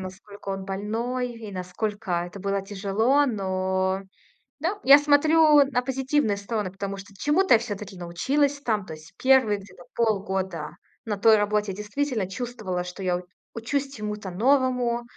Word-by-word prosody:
насколько 195 +2 -9
он 195 0 -4
больной, 230 +6 -3
и 225 -2 -9
насколько 185 0 -3
это 180 +3 -10
было 200 0 -1
тяжело, 210 +8 +1
но 190 -3 -1 0.6
Да, 370 +7 -2
я 280 +2 +9
смотрю 295 0 +5
на 250 -2 0
позитивные 265 -4 0
стороны, 200 -2 -3
потому 195 +1 -5
что 200 +1 -11
чему-то 295 - +2
я - - +3
всё-таки 205 -4 -6
научилась 275 +12 0
там. 215 -6 -1
То 160 - -8
есть 155 +1 -13
1 255 -6 +4
где-то 185 -3 -14
полгода 190 -7 -1 0.3
на 210 -2 -2
той 220 +2 +6
работе 210 -1 0
я - - -7
действительно 215 +1 -2
чувствовала, 210 -6 -4
что 180 +2 -7
я 180 -1 +1
у 180 - -8 0.3
учусь 275 +4 -2
чему-то 210 -3 -5
новому. 250 +2 +2
210 Hz, 155 wpm, -25 LUFS, 190-255 Hz, 0.6 s, я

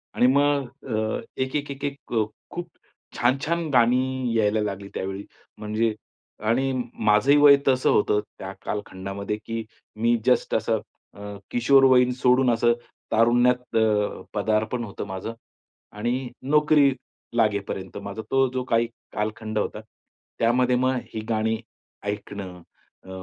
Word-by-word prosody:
आणि 125 - +4
मग 140 0 +3 0.2
अ, 110 0 -1 0.2
एक, 130 +2 -2
एक, 145 0 -4
एक, 140 +1 -8
एक 140 -3 -6
अ, 110 - +3 0.3
खूप 175 0 -5 0.5
छान-छान 155 +7 +1
गाणी 125 +1 +4 0.3
अ, 110 - +4
यायला 105 +1 +2
लागली 100 -1 -4
त्यावेळी 95 +1 -4 0.4
म्हणजे. 110 +1 0 0.5
आणि 120 +5 +1 0.2
माझंही 110 +7 +4
वय 140 -1 +9
तसं 130 -1 +3
होतं 105 0 +3 0.2
त्या 95 0 -6
कालखंडामध्ये, 100 0 -4
की 115 0 -3 0.3
मी 115 +2 +2
जस्ट 125 - +2
असं - - +1 0.3
अ, 100 0 -8 0.2
किशोरवयीन 125 0 +5
सोडून 125 0 +5
असं 120 +1 +3 0.4
तारुण्यात 120 +2 +3
अ, 105 -2 +1
पदार्पण 110 +3 0
होतं 100 0 -6
माझं 95 +4 -5 0.6
आणि 120 +4 -2
नोकरी 150 0 +4 0.5
लागेपर्यंत 100 -4 -1
माझा 100 +2 -5
तो 135 0 +4
जो 130 -1 -1
काही 115 -1 +2 0.3
कालखंड 110 +1 -3
होता. 105 - -3 0.6
त्यामध्ये 125 +2 +3
मग 130 0 +1 0.2
ही 110 - -3
गाणी 110 0 +1 0.5
ऐकणं. 100 -3 -5 0.4
अ, - - -14
115 Hz, 130 wpm, -24 LUFS, 105-130 Hz, 0.6 s, वय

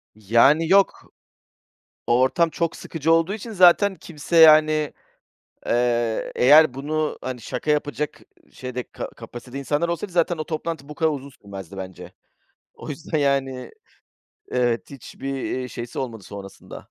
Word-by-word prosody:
Yani, 120 +10 +3
yok. 195 0 +2 0.9
O 120 +1 +3
ortam 165 +6 +2
çok 170 0 -2
sıkıcı 165 0 -1
olduğu 165 +5 +2
için 225 +2 -8
zaten 190 +1 +5
kimse, 165 +1 -5
yani, 155 -1 +6 0.7
eee, 120 -1 0
eğer 145 +1 +6
bunu, 155 +3 -2
hani, 130 -2 -5
şaka 150 - -4
yapacak 150 0 -1 0.3
şeyde, 125 -1 -5
ka - - -6
kapasitede 125 +2 -10
insanlar 145 +5 -1
olsaydı 170 +2 -4
zaten 170 -1 +1
o 155 - -3
toplantı 155 -2 -5
bu 150 - -8
kadar 160 0 +1
uzun 140 -1 -5
sürmezdi 100 -2 -9
bence. 95 -1 -8 0.6
O - - -11
yüzden, 155 +1 -3
yani, 135 -2 -1 0.8
evet 120 0 -1
hiçbir, 135 +1 -7
eee, 130 -1 -3
şeysi 120 +1 -7
olmadı 115 -6 -5
sonrasında. 100 0 -10
145 Hz, 140 wpm, -23 LUFS, 125-160 Hz, 0.9 s, yani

